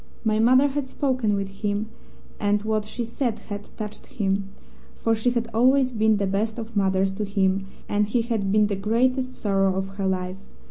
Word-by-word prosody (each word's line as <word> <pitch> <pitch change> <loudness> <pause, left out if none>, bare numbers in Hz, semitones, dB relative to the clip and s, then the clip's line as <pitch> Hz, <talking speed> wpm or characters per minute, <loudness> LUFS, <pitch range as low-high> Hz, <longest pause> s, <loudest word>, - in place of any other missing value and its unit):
My 215 -1 +2
mother 255 +5 +5
had 280 -1 -2
spoken 255 -8 0
with 195 0 -5
him, 210 +1 -1 0.5
and 205 0 +1
what 215 -1 0
she 235 +2 -4
said 235 -1 -2
had 205 -1 -7
touched 210 -1 -7
him, 195 -4 -1 0.5
for 225 - +1
she 225 +2 +1
had 235 -1 -1
always 255 +3 +4
been 220 -2 +3
the 200 - 0
best 210 +4 -1
of 230 -1 -7
mothers 190 -1 +2
to 210 +2 -3
him 195 -1 +1 0.2
and 205 0 +1
he 230 +2 +1
had 220 -5 -1
been 210 +1 +4
the 205 -1 -1
great 235 +6 +2
sorrow 195 -7 0
of 190 0 -2
her 195 - +1
life. 185 0 -2
215 Hz, 190 wpm, -24 LUFS, 195-235 Hz, 0.5 s, mother